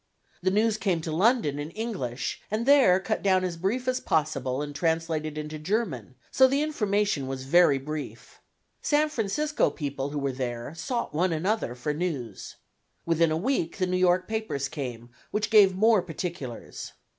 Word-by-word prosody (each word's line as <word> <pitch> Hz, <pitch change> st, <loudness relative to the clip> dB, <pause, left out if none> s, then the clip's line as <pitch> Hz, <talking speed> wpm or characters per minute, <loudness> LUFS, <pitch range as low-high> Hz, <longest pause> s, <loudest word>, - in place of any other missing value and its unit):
The 185 Hz, -, +2 dB
news 215 Hz, +2 st, +2 dB
came 190 Hz, -4 st, +1 dB
to 160 Hz, -, -4 dB
London 180 Hz, -, +2 dB
in 145 Hz, +1 st, -4 dB
English, 175 Hz, -, -4 dB
and 220 Hz, +3 st, -1 dB
there 270 Hz, -10 st, +6 dB
cut 215 Hz, +3 st, -2 dB
down 190 Hz, -2 st, +3 dB
as 180 Hz, -2 st, -2 dB
brief 210 Hz, +9 st, -2 dB
as 255 Hz, 0 st, +1 dB
possible 140 Hz, -3 st, 0 dB
and 145 Hz, 0 st, -6 dB
translated 160 Hz, 0 st, -1 dB
into 155 Hz, 0 st, -5 dB
German, 155 Hz, -, -2 dB, 0.2 s
so 260 Hz, -, +6 dB
the 275 Hz, +3 st, +1 dB
information 210 Hz, -, 0 dB
was 135 Hz, 0 st, -4 dB
very 145 Hz, 0 st, +5 dB
brief. 150 Hz, +2 st, -7 dB, 0.4 s
San 300 Hz, +1 st, +2 dB
Francisco 295 Hz, +5 st, 0 dB
people 140 Hz, -2 st, -4 dB
who 145 Hz, -, -5 dB
were 140 Hz, -1 st, -1 dB
there 125 Hz, +1 st, -4 dB
sought 235 Hz, +8 st, -3 dB
one 175 Hz, +4 st, +1 dB
another 170 Hz, -, -1 dB
for 135 Hz, +4 st, -2 dB
news. 145 Hz, -, -4 dB, 0.5 s
Within 165 Hz, 0 st, +3 dB
a 155 Hz, -, 0 dB
week 190 Hz, -4 st, -1 dB
the 185 Hz, -, +1 dB
New 180 Hz, 0 st, -1 dB
York 185 Hz, 0 st, +3 dB
papers 220 Hz, -12 st, -2 dB
came, 125 Hz, -5 st, -6 dB, 0.2 s
which 210 Hz, +1 st, -2 dB
gave 200 Hz, -4 st, +6 dB
more 215 Hz, +1 st, +4 dB
particulars. 165 Hz, -7 st, -6 dB
175 Hz, 170 wpm, -27 LUFS, 145-215 Hz, 0.5 s, there